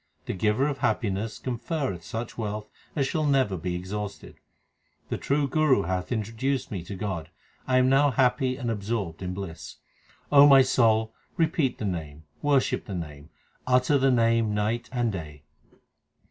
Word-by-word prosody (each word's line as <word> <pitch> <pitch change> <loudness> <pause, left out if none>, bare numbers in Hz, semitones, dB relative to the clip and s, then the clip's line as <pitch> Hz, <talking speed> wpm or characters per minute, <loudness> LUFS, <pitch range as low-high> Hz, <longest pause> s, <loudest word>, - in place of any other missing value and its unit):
The - - -3
Giver 105 +8 +1
of 140 -2 -3
happiness 110 -3 -1
conferreth 125 - -3
such 115 +7 -5
wealth 105 -1 -4 0.3
as 140 -3 +1
shall 155 +1 0
never 130 -8 +2
be 90 +1 -3
exhausted. 100 +3 -6 0.7
The - - -2
true 140 0 +1
Guru 135 -6 +3
hath 90 +4 -3
introduced 115 +4 -2
me 95 -5 -4
to 100 - -6
God; 90 -5 -4 0.4
I 130 -1 +3
am 130 0 +4
now 135 +2 +4
happy 130 +1 +1
and 120 -4 -2
absorbed 100 -5 -3
in 90 0 -4
bliss. 95 -4 -7 0.6
O 145 0 +9
my 135 -2 +8
soul, 110 -3 +2 0.2
repeat 155 -5 +1
the 110 - -4
Name, 80 -5 -4 0.2
worship 145 -2 +1
the 100 - -5
Name, 75 -3 -7 0.4
utter 130 +3 +3
the 135 +1 +3
Name 115 -3 +2
night 110 +3 -1
and 120 -3 0
day. 75 -6 -7
115 Hz, 160 wpm, -26 LUFS, 95-130 Hz, 0.7 s, O